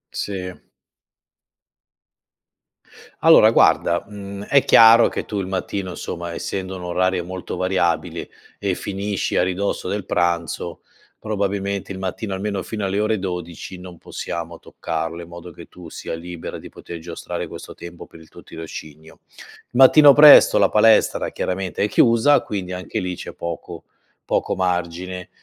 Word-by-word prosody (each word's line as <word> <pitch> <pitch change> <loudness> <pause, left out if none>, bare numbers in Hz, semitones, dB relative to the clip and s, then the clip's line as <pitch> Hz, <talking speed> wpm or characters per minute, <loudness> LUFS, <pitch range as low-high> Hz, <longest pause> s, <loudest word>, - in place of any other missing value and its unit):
Si. 90 -2 -4 2.7
Allora - - +7
guarda, 85 +1 +3
mhmm, 100 -1 -8
è 140 +5 +3
chiaro 115 +1 +7
che - - -5
tu 105 - -4
il 95 - -3
mattino, 95 0 -4
insomma, 85 -1 -6
essendo 95 +2 -5
un 90 - -8
orario 90 0 0
molto 90 +1 -6
variabile, 85 -4 -1 0.3
e 100 -2 -1
finisci 100 +1 -3
a - - +3
ridosso 95 +1 -2
del 100 0 -3
pranzo, 85 -3 -2 0.4
probabilmente 100 -2 -3
il 95 - -8
mattino, 95 +2 -4
almeno 100 0 -3
fino 110 -2 -5
alle 100 +1 -1
ore 110 0 +1
12:00, 90 -1 -6
non 90 -1 -11
possiamo 85 0 -7
toccarlo 80 +1 -5
in 85 - -11
modo 85 +1 -10
che 85 - -13
tu 90 -2 -12
sia - - -7
libera 85 0 -8
di - - -11
poter 85 -1 -10
giostrare 85 +1 -6
questo - - -10
tempo 85 0 -10
per 80 - -16
il 80 - -17
tuo - - -15
tirocinio. 80 -1 -10 0.5
Mattino 140 +3 +7
presto 145 0 +8
la - - +4
palestra, 110 +1 +3
chiaramente, 95 0 -3
è 105 - +1
chiusa 115 +7 +4
quindi 95 -3 -5
anche 90 +4 -4
lì 90 -1 -4
c'è - - -8
poco 85 0 -7 0.4
poco - - 0
margine 90 0 -3
95 Hz, 145 wpm, -21 LUFS, 85-100 Hz, 2.7 s, presto